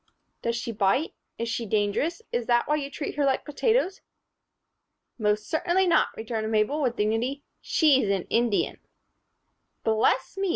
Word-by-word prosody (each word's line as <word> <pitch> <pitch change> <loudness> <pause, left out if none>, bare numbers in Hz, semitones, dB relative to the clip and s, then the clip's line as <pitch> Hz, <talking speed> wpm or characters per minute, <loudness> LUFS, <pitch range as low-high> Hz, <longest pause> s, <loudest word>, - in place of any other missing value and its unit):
"Does 235 0 -1
she 235 0 -3
bite? 210 - +1 0.2
Is 230 - -3
she 230 0 -3
dangerous? 215 - 0
Is 240 -1 -2
that 240 -1 +3
why 300 - +2
you 280 -2 -4
treat 285 0 -5
her 290 - +2
like 270 -1 +1
potatoes?" 390 - 0 1.2
"Most 210 0 0
certainly 350 +3 +1
not," 340 -2 +4
returned 220 -1 -3
Mabel, 220 +8 +1
with 250 -4 0
dignity. 235 +7 -1 0.2
"She's 275 - +3
an 195 -2 +1
Indian." 230 -3 +1 1.0
"Bless 225 - +1
me!" 390 -1 0
240 Hz, 150 wpm, -26 LUFS, 220-300 Hz, 1.2 s, not